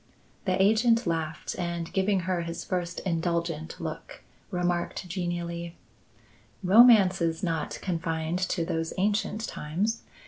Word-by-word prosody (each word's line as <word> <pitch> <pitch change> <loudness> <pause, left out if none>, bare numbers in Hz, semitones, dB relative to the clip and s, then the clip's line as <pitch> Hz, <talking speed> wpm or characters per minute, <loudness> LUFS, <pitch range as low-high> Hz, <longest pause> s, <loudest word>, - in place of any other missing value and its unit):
The 185 -1 +1
agent 225 +4 +4
laughed 160 -2 -2
and 170 -1 -3
giving 190 0 +2
her 180 0 -1
his 170 0 -5
first 175 -1 -2
indulgent 170 -2 -2
look, 160 -5 -7 0.3
remarked 180 0 -1
genially: 170 -1 -4 0.9
"Romance 195 -2 +7
is 165 0 0
not 165 -3 -2
confined 165 -1 -1
to 170 -3 0
those 165 0 -2
ancient 210 +3 0
times. 190 +10 -2
175 Hz, 115 wpm, -28 LUFS, 165-190 Hz, 0.9 s, Romance